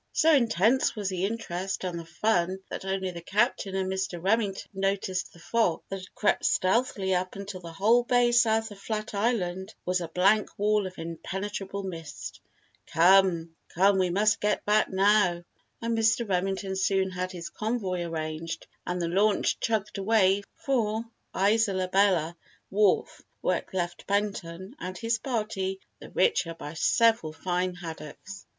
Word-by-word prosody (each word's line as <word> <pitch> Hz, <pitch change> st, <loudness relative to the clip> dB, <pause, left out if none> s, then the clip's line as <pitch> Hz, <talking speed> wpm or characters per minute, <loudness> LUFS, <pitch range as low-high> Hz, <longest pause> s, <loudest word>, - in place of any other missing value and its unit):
So 320 Hz, +1 st, +4 dB
intense 235 Hz, -, +3 dB
was 205 Hz, -3 st, -2 dB
the 185 Hz, 0 st, -1 dB
interest 195 Hz, -4 st, -3 dB
and 175 Hz, -2 st, -3 dB
the 165 Hz, -, -8 dB
fun 185 Hz, 0 st, 0 dB
that -, -, -5 dB
only 190 Hz, -1 st, -2 dB
the 170 Hz, -1 st, -8 dB
Captain 200 Hz, 0 st, 0 dB
and 190 Hz, -1 st, 0 dB
Mr. 190 Hz, -2 st, -2 dB
Remington 200 Hz, +1 st, 0 dB
noticed 195 Hz, -1 st, -1 dB
the -, -, -18 dB
fog 200 Hz, 0 st, 0 dB
that 195 Hz, -, -4 dB
had 185 Hz, -, -13 dB
crept 210 Hz, -, +1 dB
stealthily 195 Hz, -1 st, +1 dB
up 185 Hz, 0 st, -1 dB
until 195 Hz, -1 st, -6 dB
the 170 Hz, -2 st, -9 dB
whole 215 Hz, +8 st, +4 dB
bay 245 Hz, 0 st, +3 dB
south 225 Hz, -2 st, +3 dB
of 200 Hz, -, -11 dB
Flat 215 Hz, +1 st, -4 dB
Island 200 Hz, -3 st, -1 dB
was 180 Hz, 0 st, 0 dB
a 170 Hz, -, -3 dB
blank 195 Hz, +6 st, +2 dB
wall 210 Hz, -1 st, +2 dB
of 185 Hz, -, -11 dB
impenetrable 195 Hz, +4 st, -5 dB
mist. 165 Hz, -5 st, -7 dB, 0.5 s
"Come, 170 Hz, -2 st, +4 dB, 0.2 s
come 195 Hz, +2 st, +4 dB
we 185 Hz, -1 st, +2 dB
must 210 Hz, +4 st, +2 dB
get 210 Hz, 0 st, 0 dB
back 210 Hz, +1 st, +3 dB
now!" 190 Hz, -3 st, +3 dB, 0.4 s
And 230 Hz, 0 st, 0 dB
Mr. 225 Hz, +1 st, +2 dB
Remington 190 Hz, +1 st, -1 dB
soon 190 Hz, 0 st, +1 dB
had 185 Hz, 0 st, -3 dB
his 170 Hz, -2 st, -7 dB
convoy 215 Hz, -5 st, -2 dB
arranged 165 Hz, 0 st, -4 dB, 0.2 s
and 180 Hz, 0 st, -1 dB
the 170 Hz, -, -1 dB
launch 200 Hz, +4 st, +2 dB
chugged 210 Hz, -2 st, -1 dB
away 195 Hz, -1 st, +3 dB
for 225 Hz, -4 st, -1 dB, 0.3 s
Isola 200 Hz, -2 st, +2 dB
Bella 180 Hz, -4 st, +2 dB, 0.4 s
wharf 200 Hz, 0 st, +2 dB, 0.2 s
where -, -, +1 dB
it -, -, -16 dB
left 175 Hz, -2 st, -3 dB
Benton 195 Hz, 0 st, -2 dB
and 185 Hz, 0 st, -5 dB
his 230 Hz, -1 st, 0 dB
party 210 Hz, -7 st, -2 dB, 0.2 s
the -, -, -11 dB
richer 165 Hz, -, +1 dB
by 150 Hz, -2 st, -8 dB
several 225 Hz, -1 st, +2 dB
fine 180 Hz, +2 st, -1 dB
haddocks. 170 Hz, +2 st, -9 dB
195 Hz, 155 wpm, -27 LUFS, 180-215 Hz, 0.5 s, So